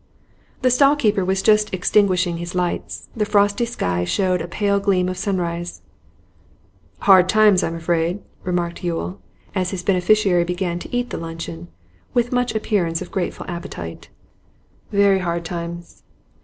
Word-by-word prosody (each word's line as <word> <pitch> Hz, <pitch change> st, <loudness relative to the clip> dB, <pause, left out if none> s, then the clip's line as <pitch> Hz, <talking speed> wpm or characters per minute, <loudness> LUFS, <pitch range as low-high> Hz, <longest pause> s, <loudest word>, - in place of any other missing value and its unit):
The 255 Hz, -, +4 dB
stall 275 Hz, +3 st, +5 dB
keeper 215 Hz, -8 st, +1 dB
was 190 Hz, +1 st, 0 dB
just 210 Hz, 0 st, +4 dB
extinguishing 185 Hz, -2 st, +2 dB
his 170 Hz, +1 st, -6 dB
lights; 180 Hz, -1 st, -3 dB
the 220 Hz, -, 0 dB
frosty 205 Hz, +2 st, +2 dB
sky 90 Hz, -, -1 dB
showed 180 Hz, -, +1 dB
a -, -, -4 dB
pale 200 Hz, +3 st, +1 dB
gleam 190 Hz, -2 st, +1 dB
of 185 Hz, -, -2 dB
sunrise. 175 Hz, -2 st, -3 dB, 1.2 s
'Hard 185 Hz, -2 st, +6 dB
times, 210 Hz, -2 st, +5 dB
I'm 165 Hz, -, -2 dB
afraid,' 165 Hz, +2 st, 0 dB, 0.2 s
remarked 175 Hz, -1 st, -2 dB
Yule, 175 Hz, +2 st, -3 dB, 0.3 s
as 185 Hz, -2 st, 0 dB
his 185 Hz, -2 st, -4 dB
beneficiary 190 Hz, -1 st, +3 dB
began 175 Hz, 0 st, -2 dB
to -, -, -9 dB
eat 245 Hz, 0 st, -1 dB
the -, -, -4 dB
luncheon 165 Hz, -, -7 dB, 0.5 s
with 240 Hz, 0 st, +2 dB
much 245 Hz, -2 st, 0 dB
appearance 185 Hz, -6 st, 0 dB
of 180 Hz, -, -13 dB
grateful 185 Hz, -3 st, -3 dB
appetite. 170 Hz, -, -7 dB, 0.8 s
'Very 200 Hz, -1 st, +4 dB
hard 170 Hz, -2 st, -2 dB
times. 170 Hz, 0 st, -6 dB
185 Hz, 145 wpm, -21 LUFS, 170-205 Hz, 1.2 s, Hard